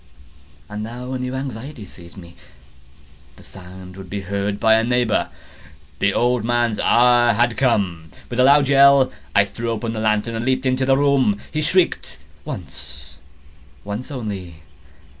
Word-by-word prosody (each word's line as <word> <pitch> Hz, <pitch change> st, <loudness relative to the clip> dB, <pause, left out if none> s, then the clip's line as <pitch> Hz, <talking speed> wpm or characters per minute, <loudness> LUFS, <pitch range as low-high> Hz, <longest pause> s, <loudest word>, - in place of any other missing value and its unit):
And 105 Hz, 0 st, -6 dB
now 125 Hz, +4 st, -6 dB
a 130 Hz, -, -3 dB
new 125 Hz, +1 st, -4 dB
anxiety 130 Hz, -2 st, -6 dB
seized 85 Hz, 0 st, -15 dB
me—the 65 Hz, -3 st, -20 dB
sound 90 Hz, 0 st, -12 dB
would 95 Hz, -1 st, -11 dB
be 100 Hz, +1 st, -4 dB
heard 100 Hz, +1 st, -3 dB
by 110 Hz, 0 st, +4 dB
a 110 Hz, 0 st, +3 dB
neighbour! 120 Hz, -2 st, 0 dB, 0.7 s
The -, -, +2 dB
old 120 Hz, -2 st, +1 dB
man's 120 Hz, -2 st, 0 dB
hour 120 Hz, 0 st, +4 dB
had 120 Hz, +1 st, +1 dB
come! 100 Hz, -11 st, 0 dB, 0.2 s
With 120 Hz, -, -5 dB
a -, -, +6 dB
loud 140 Hz, +1 st, +5 dB
yell, 140 Hz, -1 st, +5 dB, 0.2 s
I 100 Hz, 0 st, +5 dB
threw 115 Hz, +4 st, -5 dB
open 115 Hz, 0 st, -3 dB
the 110 Hz, -, -4 dB
lantern 110 Hz, +1 st, 0 dB
and 115 Hz, 0 st, -3 dB
leaped 130 Hz, +1 st, 0 dB
into 130 Hz, 0 st, 0 dB
the 135 Hz, 0 st, +4 dB
room. 135 Hz, -7 st, +2 dB
He 155 Hz, -, -2 dB
shrieked 180 Hz, +3 st, 0 dB, 0.3 s
once—once 75 Hz, -, -10 dB
only. 95 Hz, -, -7 dB
110 Hz, 150 wpm, -20 LUFS, 90-125 Hz, 0.7 s, a